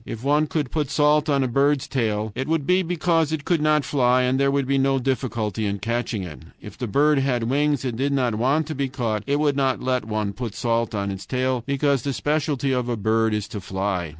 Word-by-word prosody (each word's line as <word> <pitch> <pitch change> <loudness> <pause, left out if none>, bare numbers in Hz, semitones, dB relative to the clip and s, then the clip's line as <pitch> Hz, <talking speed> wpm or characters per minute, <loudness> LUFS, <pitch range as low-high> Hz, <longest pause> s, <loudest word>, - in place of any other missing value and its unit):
If 115 +1 -7
one 150 +2 +2
could 150 -4 -2
put 150 -4 -1
salt 150 +1 +2
on 140 -2 +2
a - - 0
bird's 140 +2 +1
tail, 110 -4 -1
it 130 - -4
would 160 -3 0
be 180 +3 +3
because 165 -2 +1
it 155 -2 -3
could 170 -4 +1
not 150 -2 +2
fly 125 -2 +2
and 130 +1 +1
there 140 0 +3
would 140 -1 +1
be 135 +1 +1
no 135 0 +2
difficulty 115 -5 -2
in 100 0 -2
catching 115 -1 -2
it. 80 -4 -9 0.2
If 105 -1 -11
the 125 0 -4
bird 145 +6 +3
had 130 -3 0
wings 140 +2 +1
and 120 -2 -3
did 140 +1 +1
not 130 -4 +1
want 135 +8 +1
to 155 - -5
be 140 -2 -2
caught, 115 -5 -2
it 145 +1 +1
would 145 -2 +2
not 135 -2 +1
let 125 -2 0
one 105 -2 -2
put 115 -1 -6
salt 115 -1 -1
on 100 -1 -2
its 95 0 -7
tail, 130 -1 0
because 140 -1 +1
the 140 +2 -2
specialty 145 -2 -1
of 125 -1 -1
a 120 - -1
bird 110 +2 +1
is 105 0 -3
to 105 - -6
fly. 95 -2 -2
130 Hz, 240 wpm, -23 LUFS, 115-145 Hz, 0.2 s, be